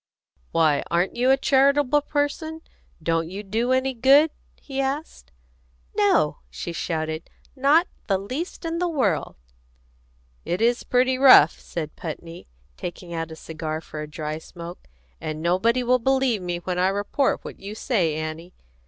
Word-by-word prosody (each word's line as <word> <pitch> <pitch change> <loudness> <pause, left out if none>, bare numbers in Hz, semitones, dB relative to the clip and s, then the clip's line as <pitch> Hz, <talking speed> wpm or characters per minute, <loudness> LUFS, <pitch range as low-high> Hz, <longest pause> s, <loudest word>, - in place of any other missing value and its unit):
"Why, 155 -3 +3
aren't 175 +2 +1
you 250 +2 +2
a 270 - +6
charitable 280 +1 +3
person? 305 +2 -2 0.4
Don't 165 0 0
you 195 +3 -6
do 225 +5 -1
any 260 +1 +2
good?" 275 +6 +5 0.3
he 275 -1 -4
asked. 270 - -4 0.6
"No!" - - +3
she 170 - -6
shouted. 160 -1 -3 0.3
"Not 290 +6 +4 0.2
the 195 - +2
least 260 - -5
in 330 0 -2
the 355 - +1
world!" 220 - 0 1.1
"It 175 - -2
is 235 +2 +2
pretty 255 +1 +2
rough," 255 - +8
said 155 -3 -6
Putney, 165 +1 -8 0.3
taking 175 0 -7
out 165 -1 -3
a 160 - -8
cigar 160 -1 -5
for 155 -1 -8
a 150 - -7
dry 155 +1 -4
smoke; 170 - -10 0.3
"and 155 0 -4
nobody 190 +9 +2
will 250 +1 +3
believe 265 -3 +1
me 175 -1 -2
when 180 +1 -3
I 185 - +3
report 205 +8 0
what - - -8
you 200 +2 -7
say, 185 - 0
Annie. 155 +3 -6
200 Hz, 155 wpm, -24 LUFS, 165-265 Hz, 1.1 s, rough